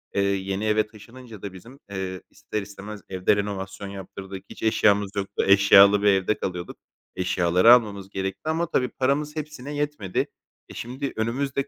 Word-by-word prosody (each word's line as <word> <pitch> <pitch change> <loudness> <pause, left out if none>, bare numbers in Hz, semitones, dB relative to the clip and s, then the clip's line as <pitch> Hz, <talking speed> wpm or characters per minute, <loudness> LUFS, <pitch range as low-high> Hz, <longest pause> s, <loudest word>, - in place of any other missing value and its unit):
eee, 100 - +3
yeni 100 +1 -1
eve 110 0 +2
taşınınca 115 0 -13
da 100 -2 -6
bizim, 120 +9 -13
eee, 95 -2 -4
ister 105 - -5
istemez 100 +1 -9
evde 95 +2 +2
renovasyon 100 -1 -4
yaptırdık. 95 0 -8
Hiç - - -10
eşyamız 105 -2 +3
yoktu. 100 0 -2
Eşyalı 100 +1 +7
bir 105 - +2
evde 95 +1 +3
kalıyorduk. 90 -2 -5 0.4
Eşyaları 90 +4 +5
almamız 100 -5 +1
gerekti 95 +10 -4
ama 165 +1 0
tabii 125 -1 +1
paramız 145 +3 -1
hepsine 150 -2 -6
yetmedi. 145 -10 -2 0.4
E, - - -10
şimdi, 130 +4 -5
önümüzde 135 +5 -1
100 Hz, 155 wpm, -25 LUFS, 95-125 Hz, 0.4 s, Eşyalı